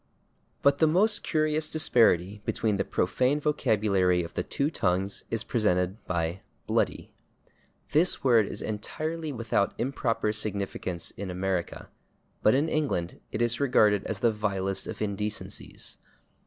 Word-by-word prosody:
But 140 0 +4
the 160 - +5
most 205 +7 +3
curious 155 -1 0
disparity 105 - +3
between 110 -3 0
the 100 - +1
profane 130 +12 +1
vocabulary 100 - +2
of 85 - -8
the - - -1
two 140 +3 -1
tongues 95 - -1
is 115 -1 0
presented 95 -3 0
by 85 +1 -1 0.3
/bloody/. - - 0 0.8
This 160 +5 +3
word 115 -6 +4
is - - -5
entirely 155 +9 -4
without 115 -5 0
improper 115 -4 0
significance 100 -5 -3
in 100 -1 -6
America, 90 -1 -3 0.5
but 110 - +4
in 145 +4 +2
England 140 - -1
it 115 - 0
is 120 0 +1
regarded 105 -7 +3
as 105 -3 -4
the 115 - +4
vilest 95 -3 -1
of - - -4
indecencies. 105 0 -4
105 Hz, 135 wpm, -28 LUFS, 95-140 Hz, 0.8 s, the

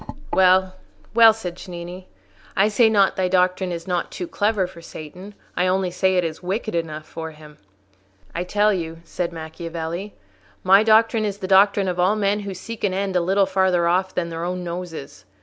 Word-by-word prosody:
"Well, 185 0 +4 0.4
well," 225 -1 +8
said 180 -6 -6
Cennini, 180 0 -8 0.5
"I 200 +2 +4
say 220 +2 +4
not 200 -3 +3
thy 185 -1 +1
doctrine 185 0 +1
is 170 -1 -5
not 180 -2 -1
too 360 - -6
clever 210 - 0
for 180 -2 -11
Satan: 180 +6 -10 0.2
I 180 - +1
only 185 0 0
say 190 +1 +1
it 180 - +2
is 160 -2 -4
wicked 200 +5 -3
enough 155 -2 -3
for 160 0 -7
him." 150 -1 -15 0.7
"I 175 - -2
tell 210 +3 +2
you," 165 -3 -5
said 170 +1 -3
Macchiavelli, 165 +3 -6 0.5
"my 195 +2 +6
doctrine 220 +1 +4
is 205 -2 -2
the 190 - -5
doctrine 195 +1 +4
of 180 -1 -2
all 185 +4 +3
men 205 0 +1
who 200 -2 -6
seek 230 +5 -8
an 190 -2 +1
end 195 -1 -2
a 180 - +3
little 195 +3 +2
farther 190 -2 +2
off 185 +2 +1
than 170 -2 -1
their 165 0 -5
own 180 +1 -3
noses. 170 -4 -7
185 Hz, 190 wpm, -22 LUFS, 170-200 Hz, 0.7 s, well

